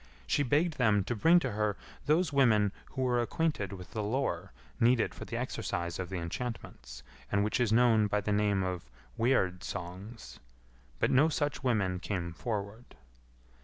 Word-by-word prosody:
She - - +1
begged 150 +4 +1
them 105 -5 +3
to 120 - -2
bring 165 +11 +5
to - - -2
her 105 -1 -1 0.3
those 155 0 +2
women 110 -7 +4 0.2
who 130 - -1
were 125 -1 +2
acquainted 120 - -1
with 90 -2 -9
the 110 - -3
lore 120 - -2 0.3
needed 115 -1 +3
for - - -8
the - - -4
exercise 85 0 -3
of 90 -2 -4
the 95 - -3
enchantments, 115 +8 -6 0.3
and 100 0 +2
which 105 - 0
is 120 -3 +2
known 115 -2 +4
by 105 +1 0
the 105 - -1
name 105 -2 +2
of 90 -4 -4 0.3
Weird 95 -7 +1
songs, 95 +6 -7 0.6
but - - +1
no 140 +5 +5
such 145 -2 -2
women 100 -8 +1
came 90 -4 -3
forward. 105 +4 -5
105 Hz, 165 wpm, -31 LUFS, 95-125 Hz, 0.6 s, bring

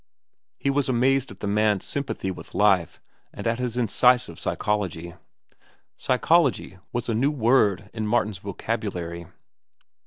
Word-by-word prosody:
He 140 - 0
was 140 -1 0
amazed 130 +2 +2
at - - -13
the 100 - -2
man's 105 -1 +1
sympathy 135 -9 -3
with - - -10
life 95 -5 +2 0.3
and - - -8
at 115 +1 0
his 125 -1 -3
incisive 125 -4 +2
psychology. 90 -5 -2 0.8
Psychology 130 - +1
was 120 0 -3
a 115 - 0
new 125 +6 +2
word 115 -8 +2
in 110 -1 -3
Martin's 105 -4 0
vocabulary. 90 -4 -4
110 Hz, 130 wpm, -25 LUFS, 100-125 Hz, 0.8 s, amazed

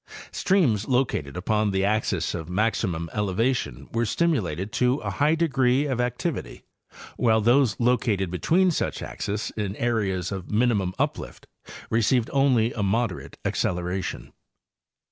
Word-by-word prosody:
Streams 140 - +2
located 125 - 0
upon 105 +3 +1
the 95 0 +1
axes 100 -4 0
of 80 -1 -5
maximum 90 -4 0
elevation 105 - -1
were 115 +1 0
stimulated 105 - 0
to 125 0 +2
a - - -3
high 150 +3 +2
degree 135 -4 +2
of 130 -4 -1
activity, 125 -1 -3 0.5
While 110 -2 +3
those 120 0 +3
located 115 -6 +1
be 90 - -4
tween 185 +2 +3
such - - -2
axes 105 +2 -4
in 105 -2 -3
areas 100 -7 -1
of 95 -2 -6
minimum 105 -5 +1
uplift - - -3 0.5
received 115 +1 +2
only 130 -4 +3
a 110 - -3
moderate 100 -1 -1
acceleration. 90 -7 -2
110 Hz, 130 wpm, -25 LUFS, 95-125 Hz, 0.5 s, While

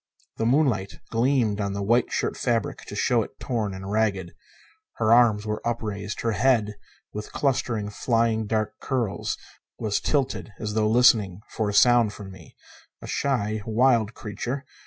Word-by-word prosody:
The 115 - 0
moonlight 120 -8 +1
gleamed 115 -3 +1
on 100 -1 -2
the 100 0 -3
white 115 +4 +2
shirt - - -1
fabric 115 -4 -1
to - - -7
show - - +2
it - - -8
torn 110 -5 -2
and 95 +1 -7
ragged. 100 -5 0 0.6
Her 110 0 +3
arms 115 -3 +4
were 105 0 -3
upraised; 105 -3 -3
her 115 - 0
head, 110 -1 +2 0.4
with 105 0 -6
clustering, 120 -6 -1
flying 115 0 0
dark 110 0 -2
curls, 120 -6 -2 0.4
was 105 -2 -1
tilted 135 -6 -1
as 105 -1 -3
though 110 0 +2
listening 110 -5 +4
for 110 -2 -1
a - - -3
sound 120 -1 +5
from 100 -2 -9
me. 95 -4 -15 0.4
A - - -10
shy, 110 -6 -1
wild 115 0 +2
creature. 120 +5 -5
110 Hz, 155 wpm, -25 LUFS, 105-120 Hz, 0.6 s, sound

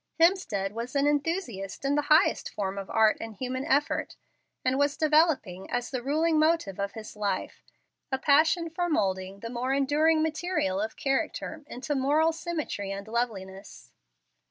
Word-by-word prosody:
Hemstead 330 - +2
was 235 +5 -6
an 280 0 +3
enthusiast 290 - -2
in 275 - +2
the 295 0 0
highest 310 +5 +4
form 195 -1 -3
of 195 - -7
art 220 -1 +4
and 225 -1 -7
human 255 +3 -3
effort, 290 0 +1 0.5
and 260 +1 +2
was 285 0 +1
developing, 300 - +2
as 245 0 -2
the 255 -2 -2
ruling 310 +4 +2
motive 310 - +1
of 200 0 -2
his 220 -1 -9
life, 200 -3 -3 0.5
a 265 - +1
passion 315 +5 +3
for 350 +2 -1
moulding 190 - -1
the 230 - -5
more 250 +2 -1
enduring 305 +3 +3
material 315 - -1
of 220 +1 -3
character 305 +3 -2
into 275 +3 -4
moral 295 +4 +3
symmetry 310 - -4
and 200 +1 -6
loveliness. 200 -4 -4
265 Hz, 155 wpm, -28 LUFS, 210-310 Hz, 0.5 s, highest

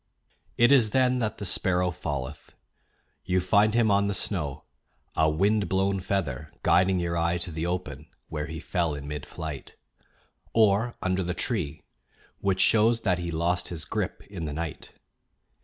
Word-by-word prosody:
It 120 +3 +5
is 125 -6 +6
then 125 +1 +2
that 110 -3 -2
the 100 - -5
sparrow 90 -1 +2
falleth. 70 -5 -5 0.7
You 95 0 +1
find 100 +4 +3
him 115 -3 +4
on 100 0 +3
the 100 - -1
snow, 75 -11 -2 0.5
a 80 0 +3
wind 100 +6 +1
blown 95 +1 +1
feather 90 -9 -2
guiding 90 +2 +4
your 85 -1 -1
eye 85 +1 +1
to 90 0 -3
the 80 +2 -3
open 80 -5 -4 0.2
where 75 -2 -4
he 80 +2 -6
fell 85 -3 -1
in 70 0 -7
mid 75 -1 -5
flight; 80 -5 -7 0.8
or 110 +2 +3
under 95 0 +1
the 90 0 -2
tree, 95 - -2 0.6
which 95 -1 +1
shows 115 +1 +4
that 90 -5 +1
he 85 -1 -3
lost 85 +2 0
his 80 -3 -5
grip - - -3
in 90 -5 -6
the 75 - -4
night. 80 0 -5
90 Hz, 165 wpm, -27 LUFS, 80-100 Hz, 0.8 s, is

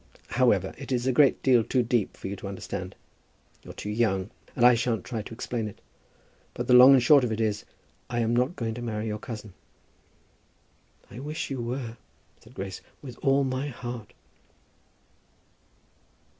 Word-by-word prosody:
However, - - +2
it - - -8
is 125 -1 0
a 130 - +3
great 135 +2 +4
deal 125 -4 +5
too 125 +2 +1
deep 115 -3 0
for - - -6
you 100 - -4
to 100 - -7
understand. 95 -1 -6 0.7
You're - - -11
too 105 - -5
young, 105 -3 0 0.2
and 120 - +3
I 125 - +8
shan't 115 -3 0
try 115 -3 -4
to 105 - -11
explain 115 -1 -3
it. 105 - -10 0.8
But - - -3
the - - +3
long 125 +2 +10
and - - +7
the - - +3
short 140 +2 +6
of 120 - 0
it 110 - -2
is, 105 -2 -1 0.4
I 120 -1 -1
am 115 +1 +1
not 125 +8 +1
going 115 -4 -3
to 120 - -7
marry 110 -2 -3
your 105 -1 -3
cousin." 110 -3 -8 1.6
"I 110 - -8
wish 150 +2 -4
you 130 -3 -3
were," 120 -1 -4 0.5
said 120 +4 -17
Grace, 95 -3 -6 0.2
"with 125 -4 -9
all 135 +1 +3
my 130 +1 -2
heart." 120 -4 -7
120 Hz, 180 wpm, -27 LUFS, 110-130 Hz, 1.6 s, long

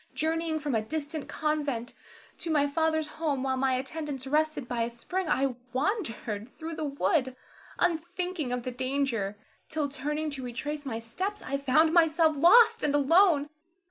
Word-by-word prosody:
Journeying 320 0 0
from 295 -3 -2
a 220 - +2
distant 300 +5 -4
convent 290 -6 -2 0.5
to 335 - -4
my 295 -3 +3
father's 315 +1 +1
home, 300 -3 -2
while 265 -1 0
my 260 0 +1
attendants 275 0 -4
rested 305 -1 0
by 245 -2 -2
a 230 - 0
spring 335 +9 -4
I 270 -2 +2 0.2
wandered 255 - -2
through 325 0 -5
the 310 -1 -3
wood, 275 -2 0 0.4
unthinking 350 -3 -1
of 250 -1 -2
the 255 - -3
danger, 255 -5 -1 0.3
till 305 -2 -1
turning 300 +3 -3
to 270 -2 -6
retrace 290 +4 -4
my 225 -4 -2
steps, 370 - -4
I 275 +1 -2
found 305 +4 +3
myself 325 -2 +4
lost 350 +11 +6
and 290 -1 +1
alone. 295 0 +4
290 Hz, 160 wpm, -28 LUFS, 260-320 Hz, 0.5 s, lost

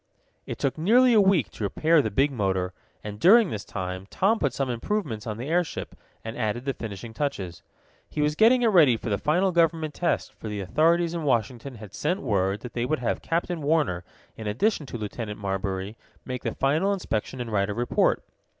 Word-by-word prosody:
It - - -4
took 140 +3 -1
nearly 240 +8 +5
a 215 - +6
week 190 - +3
to - - -7
repair 155 +10 +3
the 110 - -2
big 135 +8 +2
motor, 95 -6 -1 0.3
and, 105 0 -7
during 210 - +6
this 105 -1 -4
time, 95 -1 -5
Tom 215 +4 +2
put 140 - +1
some 135 +2 -2
improvements 120 - -3
on 110 -1 -3
the 125 +4 -5
airship, 170 +1 -1 0.3
and 110 +1 -5
added 120 +1 -2
the 135 - 0
finishing 110 -1 -7
touches. 105 - -3 0.5
He - - -6
was 150 0 +2
getting 235 +8 +5
it 230 - +5
ready 155 - +5
for 110 - -5
the 100 - 0
final 180 +5 +2
government 165 -3 +1
test, 175 - -1
for - - -9
the 105 -1 -4
authorities 165 - +2
in 170 - -3
Washington 125 -1 -1
had 105 -3 -11
sent 180 +6 -1
word 100 -3 0
that 125 - -8
they 120 - -1
would 155 +5 0
have 125 - -2
Captain 170 0 -2
Warner, 145 - +1 0.3
in 110 - -7
addition 150 - 0
to 120 - -5
Lieutenant 105 0 -5
Marbury, 95 +1 -3 0.3
make 125 -1 -4
the - - -3
final 155 +9 +2
inspection 130 - -3
and 120 -2 -4
write 100 -1 +1
a - - -1
report. 120 +1 +1
130 Hz, 205 wpm, -26 LUFS, 105-165 Hz, 0.5 s, a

